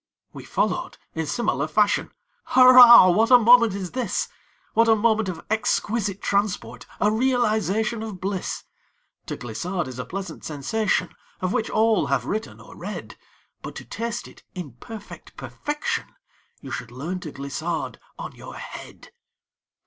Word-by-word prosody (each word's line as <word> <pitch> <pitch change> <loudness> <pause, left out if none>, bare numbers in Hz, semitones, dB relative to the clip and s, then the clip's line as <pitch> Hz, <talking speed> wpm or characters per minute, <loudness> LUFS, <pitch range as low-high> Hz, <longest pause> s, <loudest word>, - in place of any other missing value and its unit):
We - - -10
followed, - - -1 0.2
in 160 -1 -3
similar 155 - -1
fashion; 205 +5 +2 0.4
Hurrah, 250 -6 +9
what 220 +6 +3
a 250 - +9
moment 235 -3 +6
is 190 -3 -5
this! 255 -2 -2 0.4
What 230 +1 +4
a 225 - +6
moment 220 -2 +1
of 170 -3 -7
exquisite 210 -2 -1
transport! 200 0 -1
A 210 - +3
realization 220 -3 +1
of 215 -4 -6
bliss! 190 0 -3 0.6
To - - -4
glissade 170 - -4
is 125 -1 -8
a 125 - -4
pleasant 190 -4 -7
sensation, 160 +9 -1 0.3
Of 185 0 -1
which 220 - -1
all 220 0 +2
have - - 0
written, 215 +2 -4
or - - -14
read; - - -7 0.5
But - - -8
to - - -8
taste 235 +1 -4
it, - - -16
in 175 -7 -6
perfect 220 -2 -11
perfection, 325 +11 -3 0.5
You 135 - -9
should 125 -2 -5
learn 155 +10 -5
to 160 -4 -8
glissade 140 -1 -4 0.2
on - - -6
your - - -11
head. - - -10
205 Hz, 150 wpm, -24 LUFS, 175-230 Hz, 0.6 s, Hurrah